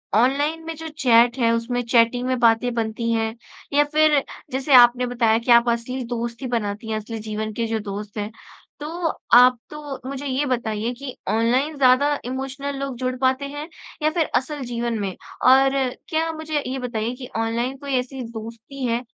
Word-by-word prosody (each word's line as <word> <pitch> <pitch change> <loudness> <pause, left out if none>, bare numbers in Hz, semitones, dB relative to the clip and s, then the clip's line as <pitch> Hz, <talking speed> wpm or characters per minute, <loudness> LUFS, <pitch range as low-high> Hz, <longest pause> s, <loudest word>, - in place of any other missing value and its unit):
Online 290 +7 +2
में 325 0 -5
जो 320 +1 -7
chat 245 -4 +3
है, 230 -1 +3
उसमें 245 +2 -1
चैटिंग 240 +1 +2
में 255 -1 +1
बातें 235 +1 +3
बनती 230 0 -2
हैं 225 0 0 0.4
या 290 +1 +5
फिर 300 -1 +3 0.3
जैसे 265 +2 0
आपने 245 0 +7
बताया 230 -2 +2
कि 240 +1 0
आप 235 0 +6
असली 245 +2 -2
दोस्ती 235 +1 -4
बनाती 220 -1 -3
हैं, 215 - -1
असली 220 +1 -6
जीवन 215 0 -4
के 230 +1 -2
जो 225 0 -1
दोस्त 205 +1 -7
हैं। 210 +1 -3 0.5
तो, 295 - -5 0.5
आप 250 +1 +8
तो 280 -3 -7
मुझे 275 +1 -5
ये 275 +2 0
बताइए 230 -3 -1
कि 260 +1 -8
ऑनलाइन 245 +8 +1
ज़्यादा 280 +2 +4
इमोशनल 270 +2 -4
लोग 275 -2 -4
जुड़ 255 0 -2
पाते 260 +2 +2
हैं 290 +2 -6 0.4
या 310 - +4
फिर 330 -2 +1
असल 285 +2 -1
जीवन 235 -1 -2
में? 195 -2 -3 0.3
और 270 +1 +6 0.3
क्या 325 -1 0
मुझे 310 -2 -2
ये 265 +1 -3
बताइए 235 -1 -3
कि 250 -1 -9
ऑनलाइन 235 +4 -1
कोई 280 -1 -5
ऐसी 260 +1 -6
दोस्ती 230 +4 -8
है, 235 +1 0
250 Hz, 180 wpm, -22 LUFS, 230-275 Hz, 0.5 s, आप